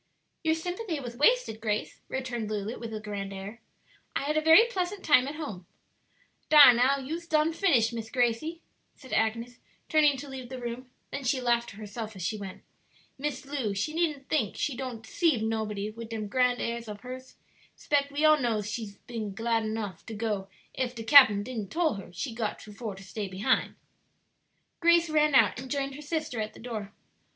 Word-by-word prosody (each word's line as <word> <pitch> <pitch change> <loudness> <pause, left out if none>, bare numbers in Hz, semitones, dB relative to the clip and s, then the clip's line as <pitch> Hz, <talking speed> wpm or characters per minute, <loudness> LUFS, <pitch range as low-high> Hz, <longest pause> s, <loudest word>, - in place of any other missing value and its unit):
"Your 320 0 +3
sympathy 355 +1 -3
was 240 -3 -7
wasted, 295 - +2
Grace," 210 -1 -2
returned 245 -5 -3
Lulu, 215 +1 -3
with 230 -1 -6
a 215 - -4
grand 205 -2 -5
air. 200 +4 -8 0.5
"I - - 0
had 300 +2 -1
a 310 - +3
very 320 +8 +8
pleasant 390 -3 -3
time 265 -4 +5
at 290 - -5
home." 210 - -7 0.8
"Dar 290 -5 +10
now, 255 +4 +3
you's 320 +6 -5
done 310 0 +2
finished, 255 - +3
Miss 225 -1 -5
Gracie," 250 +8 0 0.3
said 260 -3 -11
Agnes, 230 +3 0 0.3
turning 300 -3 +4
to 285 +3 -7
leave 260 -3 -8
the 260 -1 -6
room; 245 +1 -6 0.2
then 280 - -4
she 260 +1 +1
laughed 240 -1 +1
to - - -11
herself 215 +1 -7
as 185 - -6
she 215 - -1
went, 195 -3 -8 0.6
"Miss 285 -1 -3
Lu 265 -8 -2
she 255 +11 -2
needn't 310 -5 -1
think 230 -10 0
she 285 - -1
don't 245 -3 -6
'ceive 305 -8 +1
nobody 215 -2 -2
wid 230 +1 -9
dem 220 -2 -4
grand 250 +3 +2
airs 235 -1 -3
ob 205 -1 -7
hers; 255 +1 -9 0.4
'spect 280 -1 0
we 295 +2 +1
all 310 0 +6
knows 220 -4 0
she 215 -2 -5
been 220 -5 -5
glad 225 0 0
nuff 215 -4 -4
to 225 - -6
go 210 -3 -2 0.3
ef 250 -1 -2
de 225 - -6
cap'n 225 -4 +8
didn't 220 -4 -5
tole 335 -4 +1
her 195 -3 -9
she 180 +7 -4
got 225 -2 -3
for 215 -1 -7
to 195 - -12
stay 205 +2 -5
behin'." 195 +8 0 1.0
Grace 340 -1 +4
ran 300 -2 +3
out 260 - +5
and 260 0 -8
joined 275 -1 -2
her 290 - -9
sister 300 -6 -3
at 215 0 -5
the - - -12
door. 220 -4 -6
245 Hz, 195 wpm, -28 LUFS, 215-290 Hz, 1.0 s, Dar